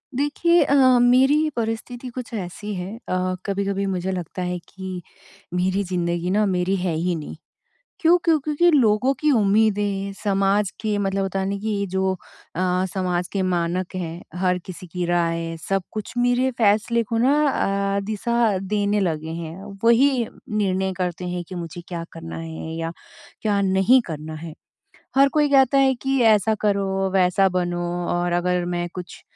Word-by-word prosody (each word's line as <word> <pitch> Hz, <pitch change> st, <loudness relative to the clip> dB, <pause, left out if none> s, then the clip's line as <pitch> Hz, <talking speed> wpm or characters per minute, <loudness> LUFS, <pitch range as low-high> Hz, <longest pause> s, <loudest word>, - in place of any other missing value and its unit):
देखिए 315 Hz, +4 st, +3 dB
अ, 280 Hz, -, +2 dB, 0.3 s
मेरी 270 Hz, +5 st, +4 dB
परिस्थिति 235 Hz, +2 st, -4 dB
कुछ 250 Hz, -2 st, -6 dB
ऐसी 205 Hz, +1 st, -5 dB
है 185 Hz, +4 st, -5 dB
अ, 185 Hz, 0 st, 0 dB
कभी-कभी 200 Hz, 0 st, -1 dB
मुझे 190 Hz, -1 st, -2 dB
लगता 180 Hz, 0 st, -5 dB
है 180 Hz, 0 st, -2 dB
कि 190 Hz, -1 st, -6 dB, 0.5 s
मेरी 185 Hz, +2 st, +1 dB
ज़िन्दगी 175 Hz, -1 st, -2 dB
ना 210 Hz, +2 st, +3 dB
मेरी 185 Hz, 0 st, +1 dB
है 180 Hz, -2 st, -1 dB
ही 175 Hz, +2 st, 0 dB
नहीं। 155 Hz, -2 st, -7 dB, 0.6 s
क्यों 345 Hz, -2 st, +5 dB
क्यों, 325 Hz, -2 st, +3 dB
क्योंकि 305 Hz, +4 st, +2 dB
लोगों 250 Hz, -2 st, +3 dB
की 300 Hz, -1 st, +3 dB
उम्मीदें 205 Hz, -3 st, +2 dB
समाज 200 Hz, 0 st, +2 dB
के 215 Hz, -2 st, 0 dB
मतलब 195 Hz, -1 st, 0 dB
होता 195 Hz, 0 st, -2 dB
है 190 Hz, -, -1 dB
ना, 200 Hz, -, -2 dB
कि 205 Hz, -1 st, -2 dB
जो 190 Hz, 0 st, 0 dB, 0.4 s
अ, 180 Hz, +1 st, +1 dB
समाज 180 Hz, -2 st, -1 dB
के 195 Hz, -, 0 dB
मानक 180 Hz, 0 st, -1 dB
हैं 170 Hz, -1 st, -5 dB, 0.2 s
हर 180 Hz, -1 st, +1 dB
किसी 185 Hz, 0 st, -9 dB
की 180 Hz, +1 st, -3 dB
राय 165 Hz, -1 st, 0 dB
सब 195 Hz, -1 st, +1 dB
कुछ 215 Hz, +2 st, -6 dB
मेरे 245 Hz, +1 st, +2 dB
फैसले 220 Hz, +2 st, +3 dB
को 225 Hz, +1 st, -2 dB
ना 260 Hz, +5 st, +4 dB, 0.6 s
अ, -, -, +2 dB
दिशा 220 Hz, 0 st, +1 dB
देने 205 Hz, +2 st, 0 dB
लगे 160 Hz, -4 st, -1 dB
हैं। 165 Hz, +4 st, -8 dB, 0.2 s
वही 240 Hz, +1 st, +4 dB, 0.2 s
निर्णय 190 Hz, -3 st, 0 dB
करते 180 Hz, -1 st, -3 dB
हैं 180 Hz, 0 st, -3 dB
कि 185 Hz, -, -6 dB
मुझे 170 Hz, 0 st, -6 dB
क्या 170 Hz, -2 st, -5 dB
करना 165 Hz, 0 st, -8 dB
है 160 Hz, 0 st, -6 dB
या 165 Hz, 0 st, -3 dB, 0.5 s
क्या 205 Hz, -2 st, +1 dB
नहीं 195 Hz, +7 st, +4 dB
करना 155 Hz, -1 st, -6 dB
है। 165 Hz, -2 st, -7 dB, 0.6 s
हर 275 Hz, +1 st, +6 dB
कोई 300 Hz, -1 st, +3 dB
कहता 275 Hz, -1 st, +5 dB
है 270 Hz, -1 st, +4 dB
कि 270 Hz, -1 st, +1 dB
ऐसा 220 Hz, -1 st, +4 dB
करो, 195 Hz, -2 st, 0 dB
वैसा 190 Hz, +1 st, +4 dB
बनो 175 Hz, -1 st, -1 dB, 0.3 s
और 175 Hz, 0 st, 0 dB
अगर 175 Hz, 0 st, +1 dB
मैं 175 Hz, 0 st, -2 dB
कुछ 180 Hz, -1 st, -8 dB
195 Hz, 165 wpm, -23 LUFS, 180-225 Hz, 0.6 s, हर